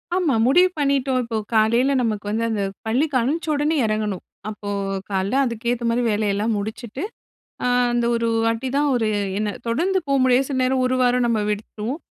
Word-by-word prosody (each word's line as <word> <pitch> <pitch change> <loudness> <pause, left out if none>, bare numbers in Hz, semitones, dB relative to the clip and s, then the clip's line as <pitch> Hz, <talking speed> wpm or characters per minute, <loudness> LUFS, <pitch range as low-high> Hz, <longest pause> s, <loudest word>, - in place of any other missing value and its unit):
ஆமா. 350 -7 +2
முடிவு 360 +7 +5
பண்ணிட்டோம், 275 -2 +1
இப்போ 230 -1 -3 0.2
காலையில 235 +5 +3
நமக்கு 215 -3 -2
வந்து 225 +1 -1
அந்த 215 -2 -1 0.3
பள்ளிக்கு 270 +5 0
அமிச்சி 320 +8 -1
உடனே 295 +2 +1
இறங்கணும். 215 -3 -2 0.3
அப்போ 205 -1 -7 0.4
காலையில 195 +5 0
அதுக்கேத்த 235 +1 -2
மாதிரி 240 +1 +1
வேலையெல்லாம் 210 +1 0
முடிச்சுட்டு, 220 - -5 0.6
ஆ - - +1 0.3
அந்த 240 -1 +1
ஒரு 230 0 0 0.2
வாட்டி 230 +3 -1
தான். 290 0 +2
ஒரு 225 -3 +1 0.3
என்ன 210 -1 -1 0.2
தொடர்ந்து 360 +11 +1
போ 275 - +1
முடியாது, 260 +1 +3
சில 270 - -2
நேரம் 260 0 +1
ஒரு 255 0 +1
வாரம் 245 0 +3
நம்ம 230 -2 +1
விட்டுடுவோம். 215 +6 -4
240 Hz, 170 wpm, -22 LUFS, 220-270 Hz, 0.6 s, முடிவு